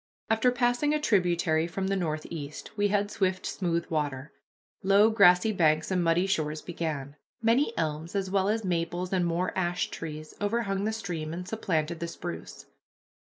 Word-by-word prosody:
After 225 +3 +4
passing 245 +4 +2
a - - +1
tributary 175 - +2
from 190 +3 -3
the 195 +1 0
northeast 155 -3 -4
we 205 -1 +2
had 205 0 0
swift 185 -2 0
smooth 170 -3 -1
water. 145 -3 -2 0.5
Low 200 +3 +5
grassy 200 0 +6
banks 160 -3 +2
and 180 -2 +2
muddy 170 +2 +3
shores 155 -5 -1
began. 150 -5 -4 0.2
Many 230 +4 +3
elms 160 +3 -2
as 195 -1 0
well 195 0 +2
as 220 0 0
maples 175 +1 -1
and 180 -2 +2
more 170 +2 -1
ash 180 -1 -1
trees 155 -1 -7
overhung 205 -2 0
the 220 - +1
stream 170 -8 -4
and 180 +1 -6
supplanted 170 -7 -1
the 170 - -3
spruce. 85 - -7
180 Hz, 160 wpm, -28 LUFS, 160-205 Hz, 0.5 s, grassy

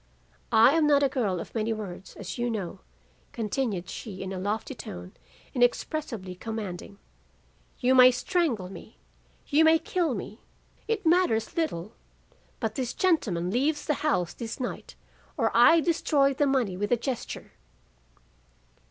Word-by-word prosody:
"'I 225 +3 +7
am 310 -2 +3
not 285 -1 +4
a 275 - +3
girl 215 -10 -1
of - - -8
many 225 0 -1
words, 200 -4 -6
as 200 +4 -7
you 240 0 0
know,' 205 -6 -4 0.5
continued 215 -5 -2
she 195 -2 -7
in 190 0 -5
a 185 - -4
lofty 210 +7 -2
tone 90 - -8 0.4
inexpressibly 245 - 0
commanding. 200 -1 -6 0.8
'You 255 0 +2
may 255 -1 +9
strangle 250 - 0
me, 195 - -12 0.5
you 305 +2 +4
may 320 0 +6
kill 325 -5 -1
me, 210 +3 -7 0.5
it 445 -4 -1
matters 325 -10 +2
little; 220 - -2 0.7
but 220 -2 -2
this 250 0 -3
gentleman 210 - +1
leaves 290 +6 0
the 300 - +1
house 180 - +1
this 230 -1 -6
night, 250 - -5 0.4
or - - +1
I 330 0 +7
destroy 290 -4 +2
the 285 +2 +1
money 250 -9 +1
with 205 +4 -3
a 245 - +4
gesture. 250 +1 -5
235 Hz, 145 wpm, -27 LUFS, 200-290 Hz, 0.8 s, may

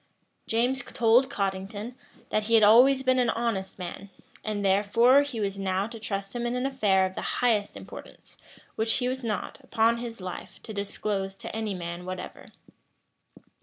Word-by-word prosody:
James 245 +4 +1
told 245 +1 +3
Cottington, 200 +1 -3 0.4
that 215 0 0
he 230 +1 +3
had 220 - +6
always 255 +6 +6
been 255 0 +3
an 245 -2 +2
honest 225 -5 -2
man, 190 +2 -7 0.3
and 205 -2 -2
therefore 220 +7 +5
he 285 -5 -4
was 200 -1 -2
now 190 0 0
to 230 +1 -8
trust 200 -1 -4
him 240 0 -1
in 240 - -2
an 250 +1 -1
affair 205 -8 +2
of 185 - -4
the - - -5
highest 220 -4 0
importance, - - -12 0.4
which 225 +1 +1
he 250 - 0
was 260 0 -3
not, 220 +3 -3
upon 230 -2 +2
his 235 -2 -6
life, 185 -1 -7
to 220 - -8
disclose 200 -1 -3
to - - -7
any 220 -3 -2
man 170 0 -6
whatever. 185 0 -7
220 Hz, 170 wpm, -27 LUFS, 195-240 Hz, 0.4 s, had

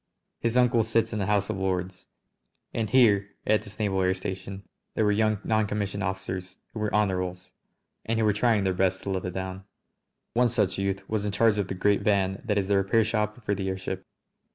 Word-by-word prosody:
His 115 +1 0
uncle 125 -2 +4
sits 115 +1 +1
in 110 - -1
the 95 - -1
House 105 0 +1
of 105 - -4
Lords. 95 -1 -2 0.7
And 110 -2 -1
here, 100 -6 +4
at 110 0 +3
this 105 -1 -11
naval 100 -3 0
air 95 0 +2
station, 95 +1 -6 0.3
there 110 - +2
were 105 - +4
young 110 0 +2
noncommissioned 105 -2 0
officers 95 -1 -4 0.2
who 110 - -5
were 105 -1 -1
Honourables, 90 -3 -1 0.5
and 115 0 -1
who 110 - +2
were 105 - +4
trying 105 -1 +2
their 95 -1 +1
best 95 +1 +1
to 100 - -3
live 95 -1 -2
it 90 - -3
down. 95 0 -4 0.7
One 120 +1 +3
such 105 -5 0
youth 95 0 -2
was 110 -2 -1
in 105 - -1
charge 110 0 +3
of 100 - -1
the 95 - -4
great 100 +2 +2
van 100 -2 +1
that 105 -3 0
is 95 -2 0
the 100 0 +3
repair 100 +4 +3
shop 105 +1 -2
for 100 - +1
the 95 -1 -2
airship. 95 0 -4
100 Hz, 210 wpm, -27 LUFS, 95-110 Hz, 0.7 s, uncle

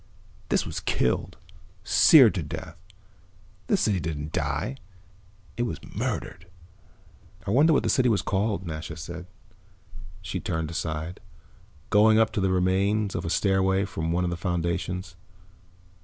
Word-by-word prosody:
This - - +1
was - - -4
killed, 60 - -1 0.5
seared - - +7
to - - -2
death. - - -7 0.9
This 200 - +2
city 100 -4 +1
didn't 75 -2 -4
die 135 - -2 0.8
it - - -1
was 120 - -2
murdered." 85 +3 -4 1.0
"I 100 - -2
wonder 145 +8 +5
what 150 - +3
the - - 0
city 125 -1 +3
was 105 -5 +1
called," 100 0 -1
Nasha 80 -1 -6
said. 85 +2 -8 1.0
She 90 +1 -4
turned 80 -2 -3
aside, 80 +1 -4 0.7
going 110 +1 +5
up 110 -1 +3
the 105 - -1
remains 95 +3 +1
of - - -3
a - - -2
stairway 95 +1 +2
from 80 -3 -3
one 90 +2 +1
of 90 - -1
the 85 - -3
foundations. 90 +1 -3
95 Hz, 140 wpm, -26 LUFS, 85-105 Hz, 1.0 s, seared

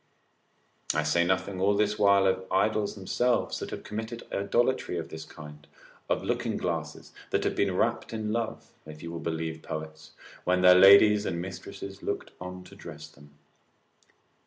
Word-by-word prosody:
I 80 - +2
say 80 +3 +2
nothing 95 +1 -1
all 100 +1 +3
this 105 0 +1
while 100 -1 +5
of 95 0 0
idols 105 +2 +1
themselves 120 +5 0
that - - -5
have - - -7
committed 110 +2 -6
idolatry 120 0 0
in 85 - -4
this 80 - -8
kind, 75 -1 -12 0.4
of - - 0
looking - - -1
glasses, - - -4 0.2
that - - 0
have - - 0
been 95 -2 +1
rapt 115 +5 0
in 110 -1 -3
love 115 -1 -3 0.2
(if 75 0 -10
you 85 - -6
will 85 - -5
believe 80 0 -3
poets), 80 0 -7 0.3
when 90 0 +2
their 90 0 +8
ladies 100 +3 +7
and 85 - -2
mistresses 95 +2 -7
looked - - -4
on 90 0 -7
to - - -14
dress - - -10
them. 75 +1 -19
95 Hz, 165 wpm, -28 LUFS, 85-105 Hz, 0.4 s, their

